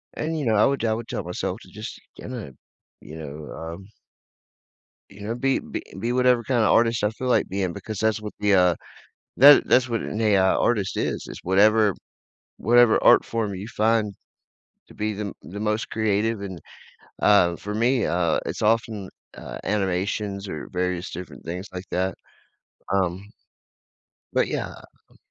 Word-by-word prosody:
and, 160 Hz, +1 st, -2 dB
you 145 Hz, -, -2 dB
know, 110 Hz, -2 st, +2 dB
I 105 Hz, -, +5 dB
would 135 Hz, -3 st, 0 dB
I 110 Hz, -, +2 dB
would 115 Hz, +1 st, -5 dB
tell 100 Hz, -, -4 dB
myself 90 Hz, +3 st, -4 dB
to -, -, -15 dB
just 110 Hz, +2 st, -8 dB, 0.2 s
kinda, 120 Hz, -, -7 dB, 0.5 s
you 75 Hz, -, -11 dB
know, 75 Hz, -1 st, -8 dB
um 85 Hz, +4 st, -8 dB, 1.2 s
you 100 Hz, -, -14 dB
know, 115 Hz, -, -2 dB
be 135 Hz, +2 st, +1 dB
be -, -, -6 dB, 0.2 s
be 115 Hz, +4 st, -1 dB
whatever 125 Hz, -1 st, +3 dB
kinda 120 Hz, -1 st, +1 dB
artist 115 Hz, 0 st, +3 dB
I 105 Hz, -, +3 dB
feel 130 Hz, +3 st, -5 dB
like 125 Hz, -, +2 dB
being 95 Hz, -2 st, -2 dB
because 100 Hz, +1 st, -6 dB
that's 110 Hz, -1 st, +1 dB
what 105 Hz, -, -6 dB
the, 105 Hz, -1 st, +2 dB
uh 90 Hz, -2 st, +4 dB, 0.6 s
that 145 Hz, +3 st, +8 dB
that's 130 Hz, 0 st, +4 dB
what 115 Hz, -2 st, -1 dB
an 105 Hz, -, -4 dB
AI 105 Hz, -3 st, +4 dB
artist 105 Hz, -5 st, +1 dB
is. -, -, -2 dB
It's -, -, -8 dB
whatever 105 Hz, +2 st, +4 dB, 0.6 s
whatever 120 Hz, -1 st, +5 dB
art -, -, +6 dB
form 110 Hz, -3 st, -2 dB
you 95 Hz, +2 st, -6 dB
find 110 Hz, -2 st, +1 dB, 0.7 s
to -, -, -15 dB
be 105 Hz, 0 st, -2 dB
the 100 Hz, -1 st, -4 dB
the 100 Hz, +3 st, -8 dB
most 105 Hz, +1 st, -1 dB
creative, 110 Hz, 0 st, 0 dB
and, 95 Hz, -4 st, -6 dB, 0.6 s
uh, 90 Hz, -5 st, +5 dB
for 105 Hz, +4 st, -6 dB
me, 120 Hz, +3 st, +2 dB
uh, 85 Hz, -2 st, +1 dB
it's -, -, -4 dB
often, 110 Hz, -3 st, +1 dB, 0.3 s
uh, -, -, -8 dB
animations 100 Hz, 0 st, -1 dB
or 80 Hz, -, -6 dB
various 90 Hz, 0 st, -2 dB
different 90 Hz, +2 st, -8 dB
things 90 Hz, +4 st, -5 dB
like 90 Hz, +1 st, -6 dB
that, 95 Hz, +1 st, 0 dB, 0.8 s
um 95 Hz, 0 st, -1 dB, 1.1 s
But -, -, +2 dB
yeah, -, -, -3 dB, 0.4 s
um -, -, -24 dB
105 Hz, 170 wpm, -24 LUFS, 95-115 Hz, 1.2 s, that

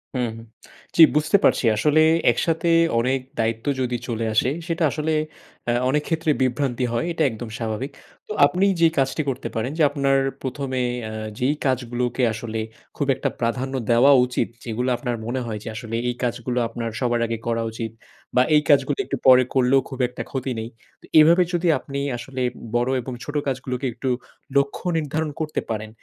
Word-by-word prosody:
হু, 125 Hz, -, 0 dB, 0.2 s
হু। -, -, -9 dB, 0.5 s
জ্বি, 165 Hz, -, +9 dB
বুঝতে 155 Hz, +7 st, +4 dB
পারছি। -, -, +3 dB
আসলে 150 Hz, +8 st, +3 dB, 0.3 s
একসাথে 165 Hz, 0 st, 0 dB, 0.3 s
অনেক 130 Hz, +3 st, +1 dB, 0.2 s
দায়িত্ব 115 Hz, 0 st, -1 dB, 0.2 s
যদি 125 Hz, -1 st, -1 dB
চলে 115 Hz, -2 st, -2 dB
আসে, 110 Hz, +4 st, +3 dB, 0.2 s
সেটা 170 Hz, -1 st, -1 dB
আসলে 155 Hz, +2 st, -2 dB, 0.6 s
এ্যাঁ 120 Hz, +1 st, +1 dB
অনেক 150 Hz, +2 st, +1 dB
ক্ষেত্রে 160 Hz, -2 st, +1 dB
বিভ্রান্তি 130 Hz, 0 st, 0 dB
হয়। 120 Hz, -, 0 dB
এটা 165 Hz, -, 0 dB
একদম 115 Hz, +1 st, -7 dB
স্বাভাবিক। 115 Hz, +4 st, -3 dB, 0.4 s
তো -, -, -8 dB
আপনি 180 Hz, +7 st, +2 dB
যেই 165 Hz, -1 st, +5 dB
কাজটি 135 Hz, +3 st, +1 dB
করতে 130 Hz, -1 st, -3 dB
পারেন 115 Hz, +4 st, -1 dB
যে 160 Hz, -, +3 dB
আপনার 140 Hz, -1 st, +2 dB, 0.2 s
১ম 135 Hz, +1 st, -4 dB
এ -, -, +1 dB, 0.2 s
এ্যাঁ 110 Hz, 0 st, -5 dB
যেই 135 Hz, +4 st, +1 dB
কাজগুলোকে 125 Hz, -1 st, -1 dB
আসলে 110 Hz, 0 st, -4 dB, 0.4 s
খুব 145 Hz, -, -1 dB
একটা -, -, -1 dB
প্রাধান্য 125 Hz, +3 st, -1 dB, 0.2 s
দেওয়া 120 Hz, +4 st, +6 dB
উচিত। 125 Hz, -, -1 dB, 0.2 s
যেগুলো 120 Hz, +2 st, -2 dB
আপনার 120 Hz, -3 st, -2 dB
মনে 125 Hz, +3 st, -2 dB
হয় 110 Hz, -2 st, -4 dB
যে -, -, -10 dB
আসলে 115 Hz, +1 st, -5 dB
এই 120 Hz, -, -2 dB
কাজগুলো 125 Hz, 0 st, -2 dB
আপনার 115 Hz, 0 st, -4 dB
সবার 120 Hz, -2 st, +1 dB
আগে 115 Hz, 0 st, -2 dB
করা 115 Hz, -1 st, 0 dB
উচিত 110 Hz, 0 st, -5 dB, 0.4 s
বা 125 Hz, -, +6 dB
এই 150 Hz, -, +6 dB
কাজগুলো 140 Hz, 0 st, +4 dB
একটু -, -, -3 dB
পরে 130 Hz, 0 st, +8 dB
করলেও 130 Hz, +1 st, +4 dB
খুব 130 Hz, -, -8 dB
একটা 125 Hz, -, -8 dB
ক্ষতি 130 Hz, -1 st, -3 dB
নেই। 110 Hz, -, -5 dB, 0.3 s
তো -, -, -16 dB
এভাবে 170 Hz, +4 st, +6 dB
যদি 175 Hz, 0 st, +1 dB
আপনি 140 Hz, -1 st, -5 dB, 0.2 s
আসলে 130 Hz, +2 st, -6 dB, 0.3 s
বড় 120 Hz, +1 st, +2 dB
এবং 130 Hz, +2 st, -6 dB
ছোট 145 Hz, -, -7 dB
কাজ 135 Hz, -1 st, 0 dB
গুলোকে 125 Hz, +1 st, -3 dB
একটু 130 Hz, -, -3 dB, 0.5 s
লক্ষ্য 140 Hz, +5 st, 0 dB
নির্ধারণ 155 Hz, 0 st, -2 dB
করতে 155 Hz, -1 st, -2 dB
পারেন। 110 Hz, -1 st, -3 dB
130 Hz, 180 wpm, -23 LUFS, 120-145 Hz, 0.6 s, জ্বি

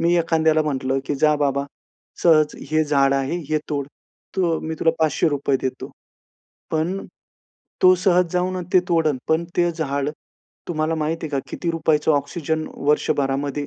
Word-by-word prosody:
मी 170 Hz, +1 st, +3 dB
एखाद्याला 160 Hz, -1 st, +2 dB
म्हटलं 135 Hz, -2 st, -1 dB
की 145 Hz, -, -1 dB
"जा 150 Hz, +2 st, +3 dB
बाबा, 140 Hz, -1 st, 0 dB, 0.6 s
सहज 155 Hz, -3 st, +4 dB, 0.2 s
हे 155 Hz, 0 st, +2 dB
झाड 140 Hz, -2 st, +3 dB
आहे, 135 Hz, +5 st, -1 dB
हे 155 Hz, -, +1 dB
तोड 140 Hz, -2 st, -2 dB, 0.5 s
तु, 170 Hz, -4 st, +1 dB
मी 160 Hz, 0 st, -4 dB
तुला 165 Hz, -, +4 dB
₹500 145 Hz, -3 st, +1 dB
देतो." 130 Hz, -1 st, -4 dB, 0.8 s
पण 170 Hz, +5 st, -1 dB, 0.8 s
तो 185 Hz, 0 st, +8 dB
सहज 180 Hz, -2 st, +3 dB
जाऊन 180 Hz, +1 st, 0 dB
न 180 Hz, -, -3 dB
ते 185 Hz, -, +6 dB
तोडेल 160 Hz, -5 st, +2 dB
पण 160 Hz, +2 st, +2 dB
ते 175 Hz, -1 st, +3 dB
झाड 140 Hz, -3 st, -2 dB, 0.6 s
तुम्हाला 160 Hz, -1 st, 0 dB
माहिती 160 Hz, +1 st, -2 dB
आहे 150 Hz, -, -9 dB
का 140 Hz, -, -1 dB
किती 170 Hz, -, -2 dB
रुपयाचं 160 Hz, -1 st, +2 dB
ऑक्सिजन 155 Hz, +2 st, -1 dB, 0.2 s
वर्षभरामध्ये 140 Hz, 0 st, 0 dB
155 Hz, 155 wpm, -22 LUFS, 140-165 Hz, 0.8 s, तो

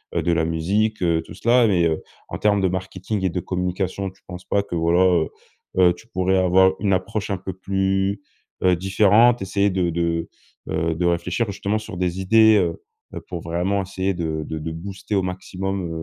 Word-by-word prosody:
heu, -, -, +1 dB
de 85 Hz, -, +1 dB
la 85 Hz, -1 st, +1 dB
musique, 95 Hz, +6 st, 0 dB
heu, 85 Hz, -2 st, +2 dB
tout -, -, -12 dB
cela. 120 Hz, 0 st, +4 dB
Mais, 90 Hz, -5 st, +2 dB
heu, 80 Hz, -1 st, 0 dB, 0.3 s
en -, -, -5 dB
termes 105 Hz, -1 st, +2 dB
de 95 Hz, -, +3 dB
marketing 95 Hz, +2 st, -3 dB
et 95 Hz, -, +2 dB
de 90 Hz, -, -2 dB
communication, 90 Hz, +2 st, -2 dB
tu 95 Hz, -, -22 dB
penses 90 Hz, 0 st, -9 dB
pas 100 Hz, -, +1 dB
que 90 Hz, -, -6 dB
voilà, 85 Hz, +2 st, +2 dB
heu 85 Hz, -4 st, +2 dB, 0.5 s
heu, 90 Hz, -1 st, +5 dB
tu 110 Hz, +6 st, -17 dB
pourrais 95 Hz, -3 st, +1 dB
avoir 95 Hz, +1 st, +4 dB
une 100 Hz, -1 st, +1 dB
approche 100 Hz, +3 st, -2 dB
un 100 Hz, -, 0 dB
peu 95 Hz, +1 st, -6 dB
plus, 95 Hz, +1 st, -1 dB, 0.4 s
heu, 90 Hz, -1 st, +4 dB
différente, 105 Hz, +6 st, +4 dB
essayer 100 Hz, +1 st, +1 dB
de 90 Hz, -2 st, 0 dB
de, 85 Hz, 0 st, -1 dB, 0.4 s
heu, 80 Hz, 0 st, 0 dB
de 85 Hz, +2 st, -2 dB
réfléchir 85 Hz, +6 st, 0 dB
justement 100 Hz, +2 st, -2 dB
sur 110 Hz, -3 st, -8 dB
des 90 Hz, 0 st, -1 dB
idées, 110 Hz, +2 st, +6 dB
heu 85 Hz, -4 st, 0 dB, 0.4 s
heu, -, -, -5 dB
pour 85 Hz, -2 st, -7 dB
vraiment 90 Hz, +5 st, -1 dB
essayer 95 Hz, +1 st, -2 dB
de 80 Hz, -3 st, -3 dB
de 80 Hz, -, -5 dB
de 80 Hz, +1 st, -5 dB
booster 95 Hz, +5 st, -5 dB
au 95 Hz, -, +2 dB
maximum, 95 Hz, 0 st, -4 dB
95 Hz, 200 wpm, -22 LUFS, 85-100 Hz, 0.5 s, idées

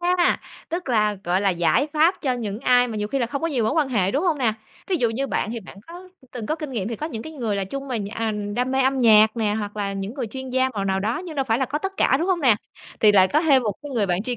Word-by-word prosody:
A, 350 Hz, 0 st, +2 dB, 0.3 s
tức 340 Hz, -3 st, -4 dB
là, 210 Hz, -3 st, +2 dB
gọi 180 Hz, +2 st, +1 dB
là, 200 Hz, -1 st, +2 dB
giải 175 Hz, -, +2 dB
pháp 325 Hz, +4 st, +3 dB
cho 260 Hz, -3 st, +1 dB
những 220 Hz, -3 st, -4 dB
ai 250 Hz, -1 st, +4 dB
mà 220 Hz, -, -5 dB
nhiều 210 Hz, 0 st, -2 dB
khi 275 Hz, -, -1 dB
là 240 Hz, -, 0 dB
không 280 Hz, +5 st, -4 dB
có 330 Hz, -, +1 dB
nhiều 255 Hz, -8 st, 0 dB
mối 220 Hz, -, +1 dB
quan 305 Hz, -4 st, +1 dB
hệ, 195 Hz, -6 st, +1 dB
đúng 285 Hz, -, 0 dB
hông 320 Hz, -5 st, +1 dB
nè? 230 Hz, -4 st, +2 dB, 0.3 s
Thí 380 Hz, -, 0 dB
dụ 235 Hz, -6 st, +1 dB
như 270 Hz, +5 st, -2 dB
bạn 220 Hz, -, -2 dB
thì 230 Hz, -, -5 dB
bạn 195 Hz, -, -13 dB
có 355 Hz, +2 st, -11 dB, 0.2 s
từng 230 Hz, -4 st, -6 dB
có -, -, 0 dB
kinh 305 Hz, -3 st, -6 dB
nghiệm, 210 Hz, -3 st, -2 dB
thì 230 Hz, -, -4 dB
có 305 Hz, -, -4 dB
những 225 Hz, -8 st, -6 dB
cái 315 Hz, -, -9 dB
người 230 Hz, -9 st, -2 dB
là 195 Hz, -, -1 dB
chung 275 Hz, +7 st, -6 dB
mà 245 Hz, -, -1 dB
nh 200 Hz, -1 st, -4 dB
à, 225 Hz, +1 st, -2 dB, 0.2 s
đam 250 Hz, +1 st, 0 dB
mê 265 Hz, -, +2 dB
âm 265 Hz, +1 st, +1 dB
nhạc 220 Hz, -2 st, +6 dB
nè, 210 Hz, -2 st, 0 dB
hoặc 210 Hz, -1 st, -4 dB
là 200 Hz, -1 st, -2 dB
những 195 Hz, +3 st, -5 dB
người 260 Hz, -4 st, -3 dB
chuyên 260 Hz, +4 st, -7 dB
gia 260 Hz, +1 st, +2 dB
màu 205 Hz, -6 st, -4 dB
nào 190 Hz, 0 st, 0 dB
đó, 220 Hz, +4 st, -1 dB
nhưng 320 Hz, -4 st, -8 dB
đâu 270 Hz, -, +1 dB
phải 225 Hz, -1 st, +1 dB
là 265 Hz, -, +1 dB
có 290 Hz, +3 st, -3 dB
tất 385 Hz, +4 st, -4 dB
cả, 265 Hz, -, +3 dB
đúng 335 Hz, -, -1 dB
hông 365 Hz, -2 st, +1 dB
nè? 250 Hz, -7 st, +5 dB, 0.5 s
Thì 210 Hz, -1 st, +6 dB
lại 190 Hz, -2 st, +5 dB
có 300 Hz, -, +2 dB
thêm 280 Hz, -6 st, +4 dB
một 210 Hz, -3 st, -1 dB
cái 290 Hz, -, -7 dB
người 230 Hz, -6 st, 0 dB
bạn 180 Hz, +1 st, 0 dB
tri 245 Hz, 0 st, -3 dB
245 Hz, 320 wpm, -23 LUFS, 210-280 Hz, 0.5 s, nhạc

